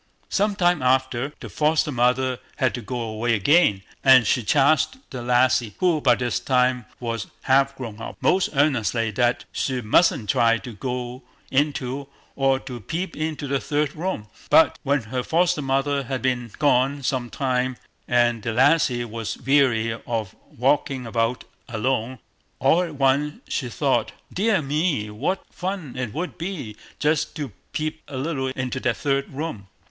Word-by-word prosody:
Some 205 +1 +1
time 175 -4 +2
after, 130 +1 +1
the - - -6
foster 150 0 +1
mother 125 0 +1 0.2
had 130 -3 +1
to 120 - -4
go 120 +3 -4
away 115 +1 0
again, 105 - +3 0.2
and 130 -3 +7
she 125 - +2
charged 145 - +3
the 130 - -5
lassie, 120 -3 +2
who 175 -4 +2
by 125 -4 +5
this 125 0 -1
time 125 -2 +1
was 115 -3 -3 0.2
half 135 +1 +3
grown 115 -5 -7
up, - - -7
most 185 0 +2
earnestly 120 -5 +1
that 120 +3 +1
she 130 -2 -1
mustn't 120 +1 +3
try 115 0 +3
to 120 0 -9
go 125 +3 -4 0.3
into, 140 -1 0 0.3
or 135 -1 +2
to 125 -3 -7
peep 165 - -4
into, 155 -1 -3
the 140 0 0
third 145 0 -1
room. 165 - -3 0.2
But - - +5
when 140 -2 +1
her 125 +4 -3
foster 170 +3 +1
mother 135 +1 0
had 130 0 -3
been 125 -2 0
gone 140 0 +2
some 125 -2 -1
time, 130 -1 -1 0.3
and 120 -2 +2
the 115 +1 -2
lassie 130 -1 +3
was 115 -1 -5
weary 125 -4 +2 0.2
of 110 -4 -3 0.2
walking 135 0 +1
about 115 +2 -1 0.3
alone, 120 +2 -1 0.4
all 135 +7 +3
at 170 -4 -4
once 140 +2 +1
she 125 - -2
thought, - - 0 0.2
"Dear 205 -3 +2
me, 145 -7 0
what 140 - -2
fun 180 -7 -5
it 125 -3 -3
would 170 - -5
be 165 - -5 0.2
just 150 0 0
to 145 -6 -4 0.2
peep 155 +1 -3
a 135 - -6
little 135 -1 -2
into 130 -1 -3
that 120 -2 0
third 140 -1 0
room." 135 -9 -5
130 Hz, 160 wpm, -23 LUFS, 120-145 Hz, 0.4 s, and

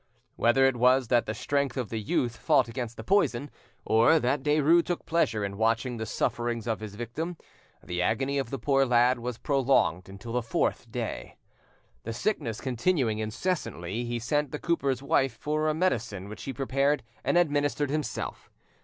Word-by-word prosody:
Whether 125 +3 +4
it 135 -2 +2
was 125 0 +4
that 120 -2 +3
the 110 - -3
strength 140 -1 -1
of 125 -3 -3
youth 115 +2 -1
fought 145 -7 +3
against 115 -1 -5
the 110 - -7
poison, 145 - +1 0.3
or 115 +8 +5
that 135 0 +1
Derues 150 +4 +4
took 175 - -3
pleasure 110 -11 +1
in 100 0 -5
watching 115 +2 +1
the 110 0 -4
sufferings 120 -2 -1
of 115 -2 -1
his 105 -2 -8
victim, 155 +10 -4 0.5
the 90 0 -3
agony 135 +9 0
of 135 -4 -3
the 135 - -3
poor 135 +2 +2
lad 125 0 +3
was 120 -1 -4
prolonged 130 - +1
until 100 +4 -8
the 125 - +1
fourth 115 -1 -1
day. - - -5 0.6
The 115 - -5
sickness 115 - -2
continuing 125 -3 0
incessantly, 110 - -3
he 120 0 -2
sent 145 +5 0
the 150 - -4
cooper's 140 -6 -1
wife 135 -3 +2
for 155 +1 -1
a 155 - 0
medicine 115 - -1
which 110 - -8
he 135 - -3
prepared 135 +2 0 0.2
and - - +2
administered 145 -3 +1
himself. 155 0 -4
125 Hz, 170 wpm, -28 LUFS, 115-145 Hz, 0.6 s, or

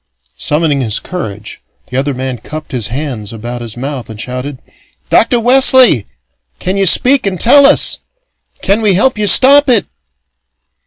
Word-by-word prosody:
Summoning 150 -2 -1
his 110 -4 -2
courage, 110 - -8 0.3
the - - -6
other 135 0 -2
man 130 -1 -5
cupped 155 +7 -9
his 120 -6 -3
hands 125 -5 -6
about 120 +2 -7
his 115 -1 -8
mouth 135 -1 -6
and 110 -1 -10
shouted: 125 +4 -6 0.5
"Dr. 235 +1 +2
Wesley! 255 - +4 0.5
Can 185 - -3
you 195 -1 +1
speak 255 +5 +2
and 185 -3 -3
tell 280 +4 +5
us? 285 - +2 0.6
Can 200 +3 +1
we 205 -4 +1
help 230 +3 +1
you 210 - 0
stop 280 +6 +5
it?" 235 -5 +2
150 Hz, 155 wpm, -12 LUFS, -, 0.6 s, tell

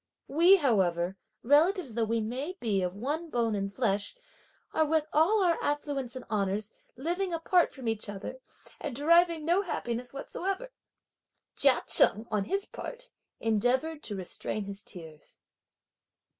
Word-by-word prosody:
We, 340 +7 +6
however, 190 - +1 0.3
relatives 300 - +3
though 230 0 0
we 225 +1 0
now 255 +10 -4
be 205 -5 0
of 180 0 -2
one 295 +10 -3
bone 235 -5 0
and 200 -1 -2
flesh, 205 - -1 0.6
are, 315 - +3
with 310 0 +1
all 380 +7 +4
our 340 -2 +2
affluence 285 -4 -2
and 255 - -7
honours, 205 0 -2 0.2
living 350 +8 -2
apart 335 +2 +2
from 260 -4 -8
each 225 -1 -2
other, 205 +6 -7 0.4
and 245 - -5
deriving 335 +2 +3
no 350 +4 +3
happiness 245 - -4
whatsoever!" 390 - -4 0.8
Chia 270 -3 +6
Cheng, 215 +2 +5
on 210 -2 0
his 395 - -1
part - - -8 0.3
endeavoured, 250 +8 0
to 210 - -4
restrain 195 +3 -4
his 200 0 -6
tears. 160 -7 -10
255 Hz, 145 wpm, -29 LUFS, 210-330 Hz, 0.8 s, We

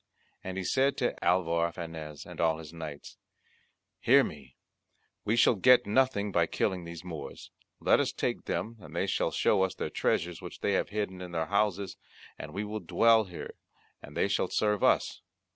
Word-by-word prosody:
And 95 0 -5
he 95 - -2
said 135 +8 +2
to 125 - 0
Alvar 85 -1 +2
Fanez 80 -3 -7
and - - -7
all 80 -1 +2
his 80 -1 -10
knights, 80 -3 -8 0.8
"Hear - - +6
me, 70 -4 -8 0.7
we 105 +2 +2
shall 120 - +5
get 125 +4 +5
nothing 105 -2 +1
by 85 -2 +2
killing 90 -1 -1
these 85 0 -8
Moors 85 -4 -8 0.3
let - - +4
us - - +1
take - - -2
them 115 +1 -3
and - - -12
they - - +1
shall - - 0
show 100 - +2
us 95 -1 0
their - - -4
treasures 85 0 -1
which 90 - -9
they 100 - +1
have - - 0
hidden 100 -3 -3
in 90 -1 -8
their 80 -1 0
houses, 100 -1 0 0.4
and 75 - -7
we 100 +6 -3
will 105 +1 -4
dwell 110 +4 +4
here 90 -3 -8 0.5
and 75 - -10
they - - +2
shall 100 -2 0
serve 105 -2 +1
us." - - +2
95 Hz, 185 wpm, -30 LUFS, 85-105 Hz, 0.8 s, Hear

